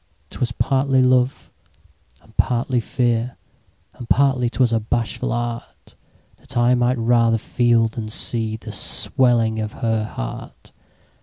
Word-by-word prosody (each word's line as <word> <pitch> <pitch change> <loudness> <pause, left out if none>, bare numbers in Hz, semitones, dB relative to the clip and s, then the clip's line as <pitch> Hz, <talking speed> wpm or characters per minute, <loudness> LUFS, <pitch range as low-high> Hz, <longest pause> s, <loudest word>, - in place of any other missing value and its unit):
'Twas 120 -1 -3
partly 135 +1 +1
love, 125 0 +1 0.7
and 110 - -23
partly 125 0 +1
fear. 120 0 -1 0.6
And 120 -2 -11
partly 130 -3 +2
'twas 120 -1 +1
a 115 - +2
bashful 115 +1 -2
artThat 120 +2 -8
I 120 +1 +4
might 125 +1 +1
rather 115 0 +2
feel, 120 0 +2
than 110 -1 -6
see, 110 0 0
The 110 - -9
swelling 115 -4 +2
of 110 -1 -4
her 115 -2 -1
heart. - - -8
120 Hz, 125 wpm, -21 LUFS, 115-125 Hz, 0.7 s, I